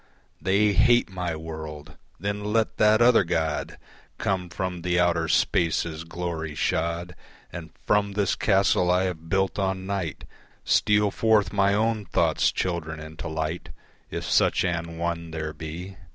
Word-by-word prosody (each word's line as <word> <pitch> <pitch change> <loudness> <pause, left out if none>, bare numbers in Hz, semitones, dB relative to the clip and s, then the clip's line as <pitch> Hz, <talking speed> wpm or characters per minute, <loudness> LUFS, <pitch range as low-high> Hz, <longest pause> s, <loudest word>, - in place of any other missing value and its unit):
They 100 +2 +3
hate 120 0 +4
my 90 -3 -3
world! 80 -1 -8 0.2
Then 100 +2 -3
let 110 +1 0
that 110 +2 +5
other 120 -4 +6
God 80 -3 -2 0.4
Come 95 -2 -1
from 90 -1 -4
the 90 0 +1
outer 85 -2 +2
spaces 80 0 +1
glory 80 -2 -4
shod, 85 +3 -1 0.4
And 85 -2 -7 0.2
from 100 -1 +2
this 100 -2 +1
castle 95 -3 +2
I 90 +1 +3
have 80 -3 -4
built 95 +2 0
on 95 -1 -1
Night 95 -5 -3 0.4
Steal 105 -1 +3
forth 110 -1 +2
my 100 0 +3
own 110 0 0
thought's - - +2
children 80 -4 -3
into 80 +1 -8
light, 80 +2 -3 0.4
If - - -4
such - - +2
an 85 -1 -3
one 85 0 -3
there 80 -1 -4
be. 85 +4 -7
90 Hz, 145 wpm, -25 LUFS, 80-100 Hz, 0.4 s, other